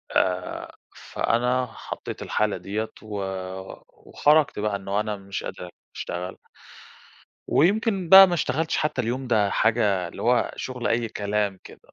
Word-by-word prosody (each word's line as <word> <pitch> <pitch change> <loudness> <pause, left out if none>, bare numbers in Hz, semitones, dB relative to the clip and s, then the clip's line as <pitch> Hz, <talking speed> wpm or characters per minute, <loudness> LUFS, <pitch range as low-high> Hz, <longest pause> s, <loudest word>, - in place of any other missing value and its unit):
آآ 90 -1 -1 0.2
فأنا 125 +2 0
حطيت - - -8
الحالة 105 -2 0
ديّة، 100 +5 -4
و 105 -2 -5 0.9
وخرجت 150 -5 +3
بقى 105 -1 0
إنه 100 +1 -2
أنا 105 0 -2
مش 100 0 -6
قادر 90 - -7 0.3
أشتغل. 90 +1 -5 1.1
ويمكن 195 +1 +2
بقى 190 +1 +11
ما 180 - -1
اشتغلتش 160 -1 0
حتى 150 -4 0
اليوم 125 +3 -3
ده 105 -4 +2
حاجة، 105 -6 +2
اللي - - -9
هو 125 +1 +2
شغل 125 -2 -4
أي 115 0 0
كلام 105 -2 -2
كده. - - -13
110 Hz, 135 wpm, -25 LUFS, 100-130 Hz, 1.1 s, بقى